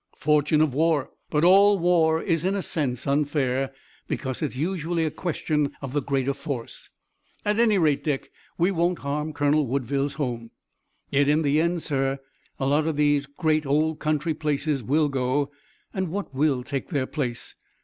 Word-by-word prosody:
"Fortune 150 0 +3
of 155 -4 +2
war. 155 -2 +1 0.2
But 150 +1 +1
all 200 +3 +6
war 165 -2 +3
is 165 -4 0
in 190 +2 +1
a 195 - -2
sense 130 -7 -2
unfair, 140 -2 0 0.4
because 130 -3 -3
it's 150 -5 -2
usually 165 +2 -1
a 155 - -1
question 150 -4 -1
of 135 -2 -6
the 145 - +1
greater 135 0 0
force. 140 -4 -6 0.6
At 210 +1 +1
any 220 -3 +4
rate, 155 -5 +2
Dick, 145 -3 -2 0.3
we 175 +3 +2
won't 175 0 +1
harm 150 +2 -2
Colonel 145 -1 +2
Woodville's 140 +2 -1
home." 120 -6 -3 0.6
"Yet 140 0 +3
in 150 +2 +3
the 145 +2 +3
end, 170 0 0
sir, 135 -2 0 0.4
a 135 - -1
lot 150 +3 +2
of 160 - 0
these 145 -1 +2
great 155 +2 0
old 155 +2 +1
country 155 +1 0
places 150 -2 -1
will 150 +7 +2
go, 135 +1 0 0.4
and 190 -2 -1
what 195 -4 -4
will 135 -2 +1
take 135 +1 -4
their 140 -7 0
place? 125 -5 -4
150 Hz, 170 wpm, -25 LUFS, 140-160 Hz, 0.6 s, all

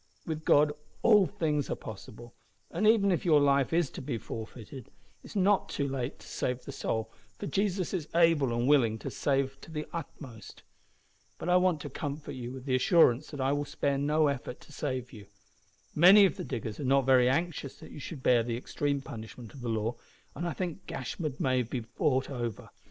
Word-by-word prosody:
With 155 -1 -4
God 150 +1 +5 0.3
all 210 -5 +6
things 155 -8 -1
are - - -1
possible, 110 +2 -10 0.4
and 215 - +1
even 210 -3 +5
if 175 - 0
your 155 -4 +5
life 140 -2 +3
is 165 -3 +1
to - - -7
be 130 -3 -3
forfeited, 115 +3 -8
it - - -25 0.3
is - - -12
not 200 0 +3
too 140 - -1
late 135 -1 -3
to - - -15
save 125 0 -3
the - - -6
soul, 110 -4 -3 0.3
for - - -5
Jesus 195 -2 -1
is 165 -5 -2
able 165 -6 +4
and 120 +1 0
willing 120 -7 +4
to - - -6
save 135 -1 -1
to - - -12
the 155 -1 -4
uttermost. 135 -8 -8 0.7
But - - -4
I 180 - +6
want 180 -4 +2
to 145 - -6
comfort 145 +1 -5
you 125 -1 -6
with 130 0 -9
the 135 - -1
assurance 130 0 +4
that 145 - -8
I 135 +1 +2
will 145 0 0
spare 140 -1 -1
no 150 +2 +2
effort 135 -3 -2
to - - -16
save 125 -1 -4
you. 105 -4 -11 0.7
Many 190 +6 +8
of 190 - +1
the 180 -3 -6
diggers 115 -4 -5
are - - -3
not 135 0 +3
very 130 -2 +5
anxious 145 -1 -1
that - - -13
you - - -9
should 145 -1 -8
bear 120 -2 +5
the 115 0 -2
extreme 140 +2 -2
punishment 115 -1 -9
of 135 - -11
the 120 - -3
law, 110 +1 -1 0.4
and 175 - -3
I 170 - -2
think 175 -2 -5
Gashford 145 +2 -4
may 130 -1 +2
be 120 +1 -4
bought 130 +3 0
over. 120 -5 -5
140 Hz, 205 wpm, -30 LUFS, 125-160 Hz, 0.7 s, Many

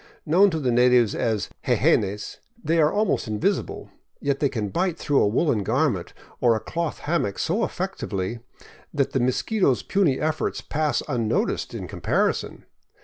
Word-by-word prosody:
Known 185 +6 +5
to 160 -3 -2
the 130 -4 0
natives 125 -2 +4
as 110 -4 -1 0.2
jejenes, 105 +1 +1 0.3
they 165 +1 +1
are 150 - +4
almost 210 - 0
invisible, 105 -1 -2 0.3
yet 140 -1 -1
they 140 - +2
can 110 -5 -3
bite 175 - -1
through 145 -2 +2
a - - +4
woolen 115 +1 +1
garment 95 - 0 0.2
or 120 -2 +4
a - - -1
cloth 170 +4 -3
hammock 145 - 0
so 200 +8 0
effectively 115 - -3 0.5
that 140 -3 0
the 135 - 0
mosquito's 130 - +1
puny 175 -10 +1
efforts 155 +1 -1
pass 155 0 -1
un 120 -6 -1
noticed - - -1
in - - -5
comparison. - - -1
140 Hz, 155 wpm, -24 LUFS, 115-165 Hz, 0.5 s, Known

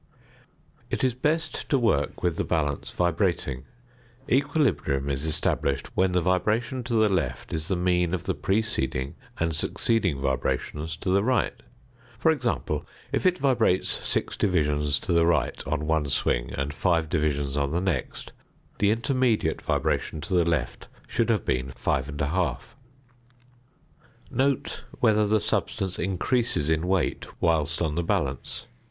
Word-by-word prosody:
It - - -2
is 130 -2 +3
best 155 +6 -1
to 140 - +4
work 110 - 0
with 85 -2 +1
the - - +1
balance 75 -4 -1
vibrating; 85 -7 0 0.6
equilibrium 115 - +1
is 70 +3 -1
established 70 -2 0
when 95 -1 +2
the 90 - +3
vibration 110 +8 0
to 120 - -3
the 110 -1 +5
left 80 -11 -2
is 80 0 -2
the 95 - 0
mean 90 0 +1
of 90 - -5
the - - -1
preceding 85 -10 -1 0.3
and 85 -1 0
succeeding 95 -1 +1
vibrations 75 +4 -2
to 95 - -2
the 100 +1 +3
right. 125 -1 +1 0.6
For - - +4
example, - - -1 0.3
if - - +2
it 180 0 +2
vibrates 120 - +2
6 - - 0
divisions 75 -6 +1
to 90 - -1
the 85 0 +4
right 85 - +1
on 75 - -1
one 80 -2 +1
swing, - - 0
and 70 +1 -2
5 80 +1 +1
divisions 75 -4 0
on 70 -1 +1
the 85 +4 0
next, 90 -8 -3 0.5
the 100 - +4
intermediate 115 - +1
vibration 80 - -1
to 85 +3 -4
the 90 -2 +4
left 80 -5 -1 0.2
should - - 0
have - - +1
been 65 +1 0
5 65 +1 -1
1/2. 80 +6 0 1.7
Note 135 +2 0 0.2
whether 105 -1 +4
the 110 +1 +3
substance 95 -2 -1
increases 95 - +1
in 80 +2 +1
weight 95 -3 -1
whilst 80 -1 +1
on 80 -2 0
the 85 - 0
balance. 70 -5 -2
85 Hz, 145 wpm, -26 LUFS, 75-105 Hz, 1.7 s, the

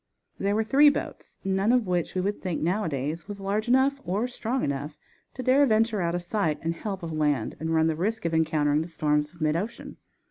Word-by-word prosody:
There 200 +1 +1
were 220 - +2
three 280 +6 +6
boats, 285 - -5
none 195 +3 +1
of 250 -3 +3
which 180 -2 -1
we 185 - +1
would 200 +2 -2
think, 180 -4 -2
nowadays, 165 -3 -2
was 205 -1 -7
large 200 +3 -1
enough 265 +3 +3
or 205 +7 -1
strong 245 +1 -2
enough 140 +2 -3 0.4
to 255 - -5
dare 260 +3 +5
venture 220 -2 +2
out 170 0 0
of 175 - -3
sight 175 -5 0
and 165 +1 0
help 195 +1 -5
of 165 -1 -4
land 150 -7 0
and 160 +1 -2
run 160 0 +3
the 160 -1 +1
risk 215 +6 -2
of 165 - 0
encountering 155 -2 +2
the 160 - -4
storms 150 -2 0
of 170 -1 -18
mid 155 0 +2
ocean. 205 +7 -5
180 Hz, 220 wpm, -26 LUFS, 160-220 Hz, 0.4 s, three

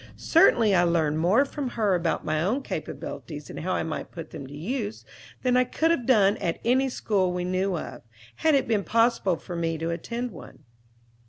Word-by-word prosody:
Certainly 230 -10 +4
I 180 - +5
learned 160 -3 +1
more 200 - +4
from 275 -2 -4
her 210 -4 +2
about 170 -2 0
my 155 0 0
own 230 - 0
capabilities, 150 - -6
and - - -7
how 185 +3 -2
I - - 0
might 160 - -5
put 165 -2 -8
them 140 -4 -8
to 145 +2 -10
use, 215 - -4 0.4
than 250 -1 +2
I 250 - +5
could 320 +6 +1
have 260 -9 -1
done 210 -5 +4
at 165 - -2
any 260 +3 +3
school 195 -7 0
we 180 0 -2
knew 185 0 0
of, - - -7 0.4
had 315 -2 +3
it 275 - +1
been 215 -3 +1
possible 230 -5 +2
for 175 +2 -8
me 165 -1 -1
to 165 +1 -2
attend 235 +8 -4
one. 180 - -13
195 Hz, 200 wpm, -26 LUFS, 170-245 Hz, 0.4 s, I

